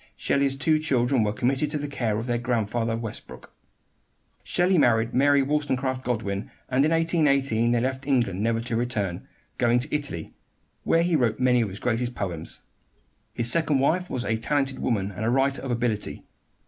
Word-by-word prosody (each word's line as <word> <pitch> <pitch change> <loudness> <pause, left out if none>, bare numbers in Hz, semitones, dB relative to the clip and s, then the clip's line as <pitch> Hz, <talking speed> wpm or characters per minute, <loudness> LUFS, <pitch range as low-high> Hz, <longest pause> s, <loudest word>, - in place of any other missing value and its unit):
Shelley's 140 -1 +1
two 155 +3 +2
children 130 -4 +1
were 105 - 0
committed 130 +5 0
to 150 - -2
the 145 0 -4
care 115 -7 -2
of 115 - -3
their 120 -1 -1
grandfather 115 -1 -1
Westbrook. 115 -2 -8 0.9
Shelley 180 0 +2
married 115 -3 +3
Mary 140 +1 +4
Wollstonecraft 135 -3 -1
Godwin, 105 -5 -3 0.2
and 130 +1 +2
in 155 - +3
1818 140 -8 +2
they 120 0 +2
left 130 +2 -3
England, 120 -9 +1
never 115 +1 +1
to 120 0 -3
return, 105 -7 -2 0.3
going 120 0 +3
to 130 +5 -2
Italy, 145 - -4 0.5
where 165 - +3
he 175 -1 +1
wrote 120 -6 +1
many 125 -1 +3
of 110 - -1
his 95 - -8
greatest 120 +2 -2
poems. 85 -5 -5 0.7
His 120 0 +5
second 155 -2 +2
wife 175 +7 +1
was 125 -2 -3
a 110 +2 0
talented 135 +3 -1
woman 105 -4 -1
and 100 +3 -6
a 110 - +1
writer 135 +2 +1
of 135 - -6
ability. 120 -3 -2
125 Hz, 175 wpm, -25 LUFS, 115-140 Hz, 0.9 s, His